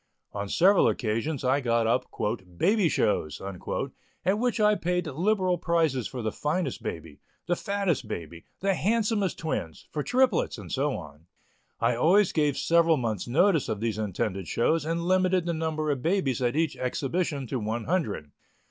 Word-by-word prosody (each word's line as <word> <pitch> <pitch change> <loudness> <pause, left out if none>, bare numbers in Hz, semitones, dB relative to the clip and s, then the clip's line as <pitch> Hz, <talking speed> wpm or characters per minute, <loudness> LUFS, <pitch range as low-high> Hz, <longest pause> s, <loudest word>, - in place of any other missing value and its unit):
On 100 -1 -4
several 190 - +5
occasions 120 +5 -1
I 130 +3 +2
got 115 -2 +1
up 115 +3 +1 0.5
"Baby 200 - +3
shows," 75 - 0
at 100 - -4
which 245 -1 0
I 210 0 +5
paid 180 -2 -1
liberal 180 +4 +1
prizes 160 -9 +1
for 125 -3 -6
the 110 - -1
finest 150 - -2
baby, 80 -3 -6 0.3
the 175 - +1
fattest 200 -5 -1
baby, 85 0 -7 0.2
the 195 +1 +2
handsomest 210 -1 +1
twins, 85 - -4
for 150 - -2
triplets, 250 - +2
and 100 -5 -9
so 140 +1 0
on. 75 0 -12 0.5
I 115 +1 +2
always 180 - +4
gave 150 -3 +1
several 165 -1 +4
months' 110 -6 -2
notice 165 +4 +3
of 105 - -2
these 110 -1 -2
intended 95 -2 -2
shows 155 +6 +1
and 165 +1 -1
limited 185 -1 +2
the 170 - 0
number 155 -1 -1
of 135 -3 -2
babies 160 - 0
at 120 +1 +1
each 160 -1 +1
exhibition 140 +3 -2
to 125 +1 -3
one 110 +2 -2
hundred. 110 - -2
150 Hz, 165 wpm, -27 LUFS, 115-180 Hz, 0.5 s, several